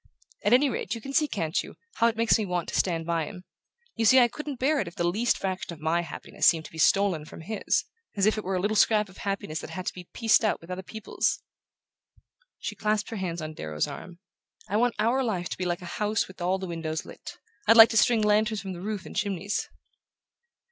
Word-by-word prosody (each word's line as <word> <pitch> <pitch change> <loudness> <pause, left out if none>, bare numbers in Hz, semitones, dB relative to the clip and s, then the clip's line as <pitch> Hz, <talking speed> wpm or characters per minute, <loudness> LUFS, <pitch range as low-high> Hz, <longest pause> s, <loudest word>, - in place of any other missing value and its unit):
At 205 - +2
any 260 +4 +6
rate, 230 -4 -3
you - - -6
can 275 +5 -8
see, 305 +1 +3
can't 165 - -1
you, - - -11 0.2
how 230 - +4
it 225 -1 -1
makes 230 0 +4
me - - 0
want 180 -3 -2
to - - -4
stand 165 -3 0
by 165 -2 0
him? 180 +3 -9 0.5
You 225 - -1
see, 240 +4 +6
I 240 -1 +5
couldn't 295 +3 -6
bear 285 +4 +2
it 190 - -2
if 170 - -9
the - - -1
least 210 +8 +1
fraction 185 -2 -3
of 160 - -12
my 160 +3 +1
happiness 170 - -2
seemed 160 -2 +4
to - - -10
be 160 - -9
stolen 190 -1 +3
from 155 - -11
his 215 +5 -1 0.3
as 195 - +3
if 215 - +3
it 215 - -4
were 190 +1 -2
a - - +1
little 205 +4 0
scrap 210 -1 +3
of 185 - -16
happiness 195 -6 -3
that - - -8
had 185 -1 -6
to - - -2
be 180 -1 -11
pieced 225 0 +3
out 215 - +1
with 165 +2 -11
other 180 +1 -4
people's!" 220 +3 -2 1.1
She - - -5
clasped 210 0 -1
her 225 - -4
hands 170 -4 -3
on 155 0 -5
Darrow's 75 - -2
arm. 175 0 -9 0.5
"I - - -2
want 240 +2 +2
our 235 +5 +2
life 185 -7 -2
to - - -5
be 185 - -1
like 175 0 -2
a 170 - -7
house 210 +1 +1
with 190 -1 -13
all 180 +2 +1
the 190 - -5
windows 160 -2 -4
lit: - - -10 0.3
I'd 225 - +7
like 225 0 +11
to 225 - 0
string 225 0 +4
lanterns 215 +1 +2
from 190 -1 -6
the 175 - -8
roof 205 -1 -4
and - - -10
chimneys!" 200 0 -2
195 Hz, 245 wpm, -27 LUFS, 175-220 Hz, 1.1 s, like